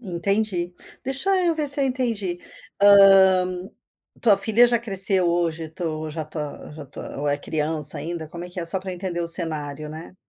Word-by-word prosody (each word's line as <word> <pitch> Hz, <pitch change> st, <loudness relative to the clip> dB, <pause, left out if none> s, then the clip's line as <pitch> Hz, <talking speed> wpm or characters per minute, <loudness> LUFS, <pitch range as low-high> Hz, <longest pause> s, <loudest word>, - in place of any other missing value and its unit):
Entendi, 190 Hz, -2 st, -2 dB, 0.3 s
deixa 270 Hz, +9 st, -1 dB
eu 340 Hz, -1 st, +1 dB
ver 305 Hz, -2 st, -1 dB
se 285 Hz, +1 st, +3 dB
eu -, -, +2 dB
entendi, 230 Hz, -9 st, -2 dB, 0.4 s
hã, 190 Hz, -2 st, +5 dB, 0.5 s
tua 210 Hz, -4 st, +4 dB
filha 220 Hz, +4 st, +4 dB
já 240 Hz, 0 st, +1 dB
cresceu 195 Hz, -4 st, +4 dB
hoje, 165 Hz, -2 st, -2 dB
tu 155 Hz, -2 st, -5 dB
já 155 Hz, 0 st, -5 dB
tá 150 Hz, -1 st, -8 dB
já 150 Hz, -1 st, -10 dB
tá -, -, -10 dB
ou 145 Hz, -, -2 dB
é 145 Hz, -, 0 dB
criança 150 Hz, 0 st, 0 dB
ainda? 160 Hz, +1 st, -6 dB
Como 170 Hz, +2 st, -8 dB
é -, -, -9 dB
que 180 Hz, -, -6 dB
é? -, -, -4 dB
Só 170 Hz, +3 st, -3 dB
para 190 Hz, 0 st, -6 dB
entender 180 Hz, -1 st, -5 dB
o 170 Hz, -, -3 dB
cenário, 150 Hz, -3 st, -1 dB
né. 160 Hz, +4 st, -10 dB
180 Hz, 185 wpm, -22 LUFS, 160-200 Hz, 0.5 s, hã